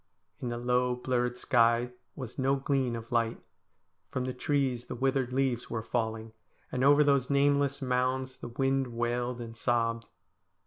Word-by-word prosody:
In 125 Hz, -, -2 dB
the 120 Hz, -, -3 dB
low, 125 Hz, +1 st, +1 dB
blurred 125 Hz, 0 st, -1 dB
sky 120 Hz, 0 st, +3 dB, 0.2 s
was 130 Hz, -2 st, -7 dB
no 135 Hz, +1 st, +3 dB
gleam 135 Hz, -3 st, 0 dB
of 115 Hz, +1 st, -8 dB
light; 115 Hz, -1 st, +1 dB, 0.7 s
from 125 Hz, -, -2 dB
the 130 Hz, -, -3 dB
trees 130 Hz, -2 st, 0 dB
the -, -, -6 dB
withered 130 Hz, 0 st, 0 dB
leaves 130 Hz, -2 st, 0 dB
were 115 Hz, -2 st, -3 dB
falling, 110 Hz, -1 st, -2 dB, 0.4 s
and 130 Hz, 0 st, -1 dB
over 145 Hz, +2 st, +6 dB
those 140 Hz, -3 st, +2 dB
nameless 140 Hz, 0 st, +2 dB
mounds 130 Hz, +1 st, 0 dB
the -, -, -7 dB
wind 135 Hz, +2 st, 0 dB
wailed 120 Hz, +1 st, -2 dB
and 115 Hz, -1 st, -7 dB
sobbed. 115 Hz, -1 st, 0 dB
125 Hz, 155 wpm, -30 LUFS, 120-135 Hz, 0.7 s, over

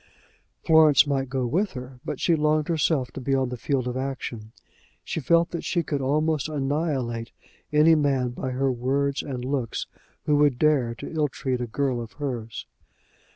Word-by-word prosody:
Florence 155 Hz, -3 st, +6 dB
might 135 Hz, -2 st, -1 dB
go 130 Hz, -1 st, -1 dB
with 185 Hz, -, 0 dB
her, 125 Hz, -1 st, -8 dB
but -, -, -4 dB
she 170 Hz, -, +3 dB
longed 155 Hz, 0 st, +1 dB
herself 155 Hz, -5 st, +1 dB
to 135 Hz, -, -7 dB
be 135 Hz, +2 st, +1 dB
on 130 Hz, -2 st, 0 dB
the 125 Hz, -, -4 dB
field 130 Hz, +1 st, -1 dB
of 125 Hz, -, -3 dB
action. 130 Hz, -5 st, -5 dB, 0.5 s
She -, -, -3 dB
felt 170 Hz, +4 st, +3 dB
that 170 Hz, -, -4 dB
she 170 Hz, -2 st, 0 dB
could 145 Hz, -2 st, -2 dB
almost 155 Hz, +2 st, +1 dB
annihilate 135 Hz, -5 st, -2 dB, 0.4 s
any 150 Hz, +2 st, +6 dB
man 140 Hz, -5 st, +2 dB
by 125 Hz, +2 st, -4 dB
her 130 Hz, +1 st, 0 dB
words 135 Hz, +3 st, 0 dB
and 125 Hz, -3 st, -5 dB
looks 130 Hz, -4 st, -2 dB, 0.4 s
who 150 Hz, -1 st, +3 dB
would 145 Hz, -4 st, +3 dB
dare 135 Hz, -5 st, +2 dB
to -, -, -8 dB
ill 155 Hz, -2 st, +1 dB
treat 130 Hz, -2 st, -3 dB
a 120 Hz, -, -2 dB
girl 130 Hz, 0 st, -1 dB
of 115 Hz, -, -9 dB
hers. 120 Hz, -, -5 dB
135 Hz, 180 wpm, -25 LUFS, 125-150 Hz, 0.5 s, Florence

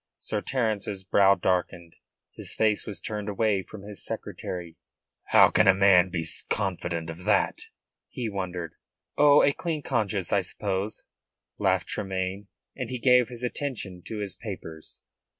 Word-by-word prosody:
Sir -, -, -3 dB
Terence's 105 Hz, -6 st, -1 dB
brow 100 Hz, +1 st, +5 dB
darkened. 85 Hz, -3 st, -1 dB, 0.4 s
His -, -, -6 dB
face 110 Hz, -2 st, +2 dB
was 105 Hz, -, -3 dB
turned 105 Hz, -1 st, -4 dB
away 105 Hz, -1 st, +1 dB
from 100 Hz, +1 st, -11 dB
his 105 Hz, -1 st, -4 dB
secretary. 85 Hz, -3 st, -5 dB, 0.5 s
"How -, -, +6 dB
can -, -, +4 dB
a 95 Hz, -, +7 dB
man 95 Hz, -2 st, +5 dB
be 85 Hz, -2 st, -2 dB, 0.2 s
confident 85 Hz, -5 st, -2 dB
of 85 Hz, +2 st, -10 dB
that?" 105 Hz, -, +2 dB, 0.5 s
he 125 Hz, -4 st, -4 dB
wondered. 95 Hz, -5 st, -4 dB, 0.4 s
"Oh, 145 Hz, 0 st, +6 dB
a 140 Hz, -, +4 dB
clean 160 Hz, -2 st, -3 dB
conscience, 105 Hz, -7 st, -1 dB
I 100 Hz, -, +4 dB
suppose," 100 Hz, +2 st, -3 dB, 0.5 s
laughed -, -, +2 dB
Tremayne, 95 Hz, 0 st, -3 dB, 0.3 s
and -, -, -4 dB
he 130 Hz, -, -3 dB
gave 125 Hz, 0 st, +4 dB
his 125 Hz, 0 st, -6 dB
attention 120 Hz, -8 st, -4 dB
to 110 Hz, -, -5 dB
his 100 Hz, -3 st, -4 dB
papers. 80 Hz, -7 st, -8 dB
100 Hz, 150 wpm, -27 LUFS, 90-110 Hz, 0.5 s, a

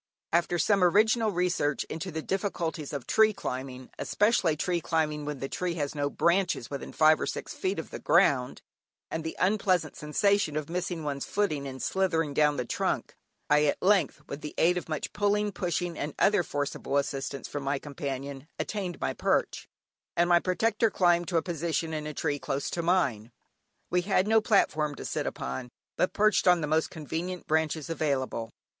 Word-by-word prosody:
After 175 Hz, +1 st, +2 dB
some 195 Hz, +3 st, +3 dB
original 220 Hz, +5 st, +4 dB
research 175 Hz, -6 st, 0 dB
into 165 Hz, +4 st, -5 dB
the 160 Hz, -2 st, -4 dB
difficulties 170 Hz, -6 st, -2 dB
of 140 Hz, -4 st, -5 dB
tree 220 Hz, 0 st, +4 dB
climbing 130 Hz, -6 st, -6 dB
(especially 200 Hz, -7 st, +2 dB
tree 175 Hz, +2 st, 0 dB
climbing 155 Hz, -3 st, -1 dB
when 150 Hz, -1 st, -4 dB
the 135 Hz, -, -4 dB
tree 175 Hz, +4 st, -2 dB
has 145 Hz, -4 st, -2 dB
no 145 Hz, -1 st, -1 dB
branches 170 Hz, -6 st, +1 dB
within 140 Hz, -, -5 dB
five 155 Hz, 0 st, +4 dB
or -, -, -1 dB
six -, -, -4 dB
feet 190 Hz, +1 st, -2 dB
of 160 Hz, -, -6 dB
the -, -, -6 dB
ground), 140 Hz, -7 st, +2 dB, 0.5 s
and 160 Hz, -, -3 dB
the 160 Hz, -, -5 dB
unpleasant 185 Hz, -5 st, +1 dB
sensation 155 Hz, +1 st, +1 dB
of 155 Hz, +1 st, -4 dB
missing 175 Hz, -2 st, -2 dB
one's 140 Hz, -2 st, -3 dB
footing 155 Hz, -9 st, -1 dB
and 130 Hz, -1 st, -6 dB
slithering 165 Hz, -6 st, 0 dB
down 150 Hz, 0 st, +3 dB
the 125 Hz, -, -1 dB
trunk, -, -, -2 dB, 0.3 s
I 150 Hz, 0 st, +4 dB
at 145 Hz, -, +1 dB
length, 190 Hz, -5 st, +2 dB
with 140 Hz, -, -7 dB
the 150 Hz, -, -7 dB
aid 175 Hz, +2 st, +4 dB
of 180 Hz, -, -4 dB
much 155 Hz, -2 st, -3 dB
pulling, 205 Hz, 0 st, +1 dB
pushing, 175 Hz, -2 st, -2 dB
and 145 Hz, 0 st, -4 dB
other 205 Hz, -1 st, +4 dB
forcible 145 Hz, -3 st, -2 dB
assistance 140 Hz, 0 st, -2 dB
from 145 Hz, -, -5 dB
my 140 Hz, +1 st, 0 dB
companion, 140 Hz, 0 st, -6 dB
attained 190 Hz, -5 st, -3 dB
my -, -, -1 dB
perch, -, -, 0 dB, 0.5 s
and 175 Hz, 0 st, +4 dB
my 175 Hz, -1 st, +5 dB
protector 225 Hz, +6 st, +1 dB
climbed 175 Hz, -3 st, +2 dB
to 175 Hz, -, 0 dB
a 165 Hz, -, +1 dB
position 165 Hz, -1 st, -2 dB
in 150 Hz, -1 st, -3 dB
a 150 Hz, -, -5 dB
tree 145 Hz, 0 st, -1 dB
close 135 Hz, +1 st, -3 dB
to 170 Hz, -, -2 dB
mine. 140 Hz, -, +1 dB, 0.6 s
We 180 Hz, -, +3 dB
had 190 Hz, +1 st, +1 dB
no 220 Hz, 0 st, +5 dB
platform 155 Hz, -8 st, +2 dB
to -, -, -8 dB
sit -, -, -2 dB
upon, 65 Hz, -, -4 dB, 0.3 s
but 180 Hz, -, +1 dB
perched 215 Hz, -2 st, +3 dB
on 180 Hz, -1 st, +5 dB
the -, -, 0 dB
most 155 Hz, +2 st, +1 dB
convenient 165 Hz, +4 st, -5 dB
branches 155 Hz, -1 st, 0 dB
available. 135 Hz, -8 st, -1 dB
160 Hz, 185 wpm, -28 LUFS, 145-185 Hz, 0.6 s, my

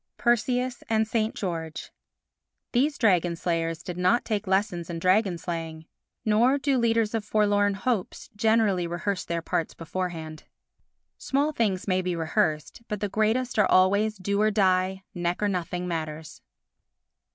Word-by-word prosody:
Perseus 245 Hz, +1 st, +1 dB
and 220 Hz, -1 st, +2 dB
St. 220 Hz, 0 st, -1 dB
George 165 Hz, -5 st, -5 dB, 0.8 s
These 280 Hz, +4 st, +1 dB
dragon 180 Hz, -6 st, +2 dB
slayers 165 Hz, -1 st, -2 dB
did 180 Hz, -1 st, -6 dB
not 185 Hz, +7 st, +2 dB
take 215 Hz, -2 st, -2 dB
lessons 190 Hz, -3 st, 0 dB
in 170 Hz, -, -4 dB
dragon 185 Hz, +1 st, +2 dB
slaying, 165 Hz, -2 st, -5 dB, 0.4 s
nor 230 Hz, +6 st, +4 dB
do 275 Hz, -2 st, +1 dB
leaders 230 Hz, -2 st, +1 dB
of 225 Hz, -2 st, -1 dB
forlorn 205 Hz, -1 st, +2 dB
hopes 210 Hz, -1 st, -2 dB
generally 210 Hz, -4 st, +2 dB
rehearse 175 Hz, +2 st, -2 dB
their 170 Hz, -1 st, -3 dB
parts 165 Hz, -, -2 dB
beforehand. 165 Hz, -2 st, -5 dB, 0.7 s
Small 285 Hz, +3 st, 0 dB
things 210 Hz, -10 st, -1 dB
may 185 Hz, -1 st, +2 dB
be 180 Hz, -1 st, -2 dB
rehearsed, 160 Hz, +2 st, -1 dB
but 210 Hz, -2 st, -3 dB
the 205 Hz, 0 st, -2 dB
greatest 220 Hz, +4 st, 0 dB
are 205 Hz, -, +4 dB
always 200 Hz, +3 st, +3 dB
do 200 Hz, +2 st, -1 dB
or 215 Hz, -, +4 dB
die, 190 Hz, -2 st, +1 dB
neck 175 Hz, 0 st, -2 dB
or 210 Hz, -, +1 dB
nothing 180 Hz, -1 st, -2 dB
matters. 160 Hz, -2 st, -5 dB
195 Hz, 145 wpm, -26 LUFS, 175-220 Hz, 0.8 s, nor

